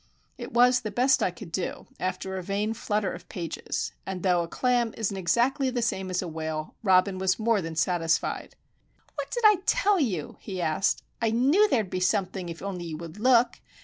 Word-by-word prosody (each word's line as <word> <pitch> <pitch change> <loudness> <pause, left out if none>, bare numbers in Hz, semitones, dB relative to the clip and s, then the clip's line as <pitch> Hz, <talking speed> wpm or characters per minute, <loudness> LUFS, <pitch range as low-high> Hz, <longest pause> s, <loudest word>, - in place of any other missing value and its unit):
It - - -8
was 250 +1 +5
the 215 - -4
best 255 +5 +3
I - - +2
could 175 0 -10
do, 180 +1 -3
after 185 +1 -3
a 190 - -3
vain 200 +4 -1
flutter 210 -2 -1
of - - -11
pages, 170 -4 -4
and 190 -2 -5
though 180 -2 +3
a 170 - -3
clam 245 +3 0
isn't 205 -3 -1
exactly 240 +9 +1
the 245 -2 -1
same 190 -4 -1
as 180 0 -1
a - - -5
whale, 155 -1 -4
Robin 190 -1 +3
was 185 0 +2
more 225 -2 +2
than 165 -1 -5
satisfied. 165 0 0 0.6
"What - - -5
did 480 - -3
I 420 -2 +8
tell 400 -1 +3
you?" 190 - -2
he 190 -3 -6
asked. 170 +2 0 0.2
"I 225 - +2
knew 280 - +4
there'd 215 - +1
be 185 - -1
something 185 -1 0
if 165 +2 -8
only 185 -3 -4
you 160 -2 -5
would 170 +4 -9
look! 240 0 +4
190 Hz, 200 wpm, -27 LUFS, 180-235 Hz, 0.6 s, I